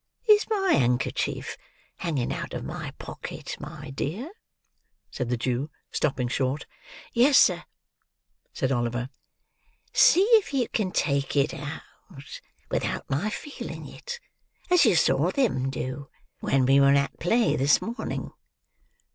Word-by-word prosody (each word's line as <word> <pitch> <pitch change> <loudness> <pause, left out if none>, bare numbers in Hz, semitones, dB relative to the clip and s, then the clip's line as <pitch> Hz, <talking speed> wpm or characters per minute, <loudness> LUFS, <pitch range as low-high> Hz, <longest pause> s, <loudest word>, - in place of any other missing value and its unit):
—Is 425 0 +5
my 390 -4 +1
handkerchief 125 -1 0 0.4
hanging 150 -9 -1
out - - -5
of - - -4
my - - -5
pocket, - - -7
my 150 -2 -8
dear?" 190 - -4 0.8
said 125 -3 -3
the 125 - 0
Jew, 125 +4 -1 0.2
stopping 135 -4 0
short. 130 +3 -1 0.5
"Yes, 255 +4 +5
sir," 175 -2 +5 0.9
said 130 - -1
Oliver. 120 0 -1 0.8
"See 390 -7 +6 0.2
if 300 - -7
you 250 -4 +1
can 210 -4 -1
take 140 -4 0
it 140 +1 +2
out, 145 +2 -6 0.9
without - - -2
my 155 +11 0
feeling 290 +7 -7
it; 485 -1 -8 0.5
as 360 -2 +6
you - - +4
saw - - +3
them 205 - +1
do, 135 +1 -5 0.3
when 135 -1 +2
we 135 +2 +5
were 140 0 +6
at 140 -1 0
play 225 +7 +2
this 140 +3 +4
morning." 235 +3 -4
145 Hz, 130 wpm, -26 LUFS, -, 0.9 s, See